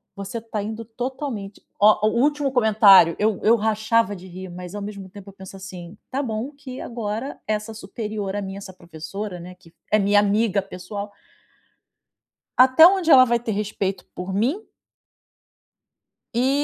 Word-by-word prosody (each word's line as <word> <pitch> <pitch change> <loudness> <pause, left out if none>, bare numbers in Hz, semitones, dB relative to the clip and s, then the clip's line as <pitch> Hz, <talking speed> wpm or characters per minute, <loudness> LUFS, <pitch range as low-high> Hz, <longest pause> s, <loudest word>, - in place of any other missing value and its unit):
"Você 200 +3 -5
tá 220 -2 -4
indo 220 +2 -6
totalmente" 240 -3 -6 0.2
ó, 215 +1 +5
o - - +2
último 290 -1 +1
comentário, 210 -8 +6
eu 215 -1 +1
eu 225 +2 +5
rachava 220 0 +1
de 185 0 -12
rir, 185 +1 -9
mas 180 +2 -9
ao 205 - -5
mesmo 200 -2 -8
eu 200 -1 -12
penso 190 0 -11
assim: 185 0 -10
"Tá 270 +2 -2
bom 230 +2 -4
que 275 -3 -10
agora 230 +3 -5
essa 215 +1 -2
superior 210 -1 -5
a 205 - -2
mim, 195 -1 -6
essa 195 -1 -9
professora, 180 +3 -7
né, 180 +1 -10
que 170 -2 -21 0.2
é 215 - +4
minha 205 +1 +4
amiga 205 0 +1
pessoal" 200 +2 -8 1.5
"até 260 +6 +8
onde 370 -3 +2
ela 260 -2 +9
vai 235 -1 +1
ter 235 -1 -4
respeito 200 -2 -3
por 180 +1 -5
mim?". 265 - -1 1.7
"E 250 +2 +2
210 Hz, 160 wpm, -22 LUFS, 195-230 Hz, 1.7 s, ela